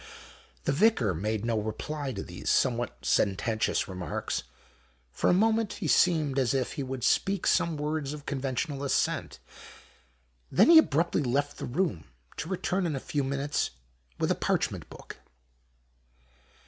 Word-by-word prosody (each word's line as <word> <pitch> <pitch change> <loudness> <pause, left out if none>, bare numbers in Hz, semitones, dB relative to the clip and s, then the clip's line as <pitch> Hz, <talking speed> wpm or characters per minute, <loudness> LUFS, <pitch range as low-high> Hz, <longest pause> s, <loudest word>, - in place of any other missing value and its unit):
The - - +1
Vicar 140 - +3
made 105 +5 -2
no 115 -2 +1
reply 135 +7 -4
to 100 -5 -5
these 90 +1 -6
somewhat 115 - 0
sententious 105 - +1
remarks. 90 -4 -3 0.7
For - - +1
a - - +5
moment 220 +1 +2
he 180 - -4
seemed 150 -4 +3
as 130 0 +1
if 130 -2 0
he 145 - -4
would 130 -2 -5
speak 195 0 +1
some 165 -2 +2
words 150 -1 -2
of 150 -1 -8
conventional 140 +1 -2
assent. 140 - 0 1.1
Then 220 - +6
he 325 - +11
abruptly 170 - +2
left 140 +2 -1
the - - -4
room, 120 - -1 0.3
to 160 - -4
return 185 0 -1
in 155 - -2
a - - -2
few 145 +2 -2
minutes 140 +2 -1 0.5
with - - 0
a - - +5
parchment - - -1
book. - - -11
140 Hz, 150 wpm, -28 LUFS, 115-165 Hz, 1.1 s, he